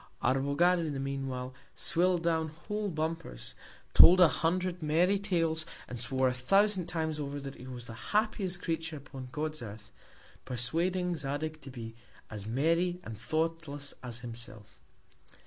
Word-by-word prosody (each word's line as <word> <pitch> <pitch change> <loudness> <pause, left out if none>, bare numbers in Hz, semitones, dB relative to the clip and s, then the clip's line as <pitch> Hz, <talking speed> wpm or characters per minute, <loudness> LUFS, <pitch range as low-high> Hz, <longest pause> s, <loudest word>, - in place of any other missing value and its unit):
Arbogad, 140 +7 +3
in 160 -3 -2
the 135 - -3
mean 135 0 -2
while, 130 0 -4 0.2
swill'd 175 0 +2
down 160 -1 +1
whole 205 +7 -4
Bumpers, 160 - -4 0.4
told 180 +2 +10
a 180 - +9
Hundred 180 +3 0
merry 170 +6 +3
Tales, 165 -5 +1 0.2
and 125 - -5
swore 130 +2 +2
a 125 - +1
thousand 195 +8 +3
Times 160 -3 -2
over, 145 0 -3
that 135 -1 -6
he 125 - -11
was 125 -2 -7
the 115 - -8 0.2
happiest 205 -4 +1
Creature 160 -2 -2
upon 135 -2 -9
God's 155 +1 -3
Earth; 105 -2 -9 0.5
persuading 170 +8 0
Zadig 155 +2 -3
to 135 - -9
be 115 -3 -7 0.4
as 105 -1 -6
merry, 165 +9 +1
and 115 - -6
thoughtless 155 +3 -2
as 125 -1 -4
himself. 115 -3 -8
155 Hz, 150 wpm, -31 LUFS, 130-175 Hz, 0.5 s, told